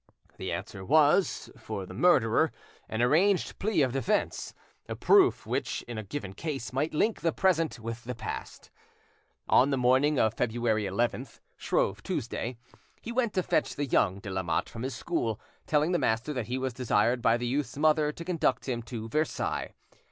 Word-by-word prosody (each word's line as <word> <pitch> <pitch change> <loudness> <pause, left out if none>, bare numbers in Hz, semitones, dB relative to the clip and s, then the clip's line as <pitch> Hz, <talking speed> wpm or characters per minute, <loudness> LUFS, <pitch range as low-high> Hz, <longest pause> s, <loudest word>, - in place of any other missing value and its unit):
The - - -4
answer 95 - -5
was, 155 - +3
for - - -5
the - - -10
murderer, - - +3 0.4
an 110 +2 0
arranged 175 +9 +2
plea 195 -7 +2
of 130 - +1
defence, 180 - -1 0.3
a - - -3
proof 390 -2 +4
which, - - -2
in 120 -2 -6
a - - -5
given 100 -1 -6
case, 135 0 -5
might 145 +5 0
link 220 +8 +1
the 165 - +2
present 165 -4 +1
with 115 +1 -6
the 125 0 -4
past. 115 - -7 0.8
On 130 - +5
the 135 - +1
morning 130 +4 +3
of 110 -1 +3
February 115 -2 0
11th, 120 +5 -2 0.2
Shrove - - 0
Tuesday, 120 +1 -3 0.4
he 230 - -7
went 235 -3 0
to 185 -3 +1
fetch - - 0
the 145 - -1
young 100 -7 +2
de 100 0 -7
Lamotte 95 -4 -1
from 115 - -8
his 130 +2 -3
school, 115 -11 -2 0.3
telling 155 +2 +2
the 175 - +2
master 115 +7 0
that 125 -5 -3
he 125 +2 -2
was 130 -1 -2
desired 120 0 +1
by 115 -1 +4
the 120 - -4
youth's 135 +3 -2
mother 150 0 +3
to 170 +2 -9
conduct 160 -8 0
him 120 -3 -2
to 115 -1 -6
Versailles. 155 +7 -2
130 Hz, 180 wpm, -29 LUFS, 115-155 Hz, 0.8 s, On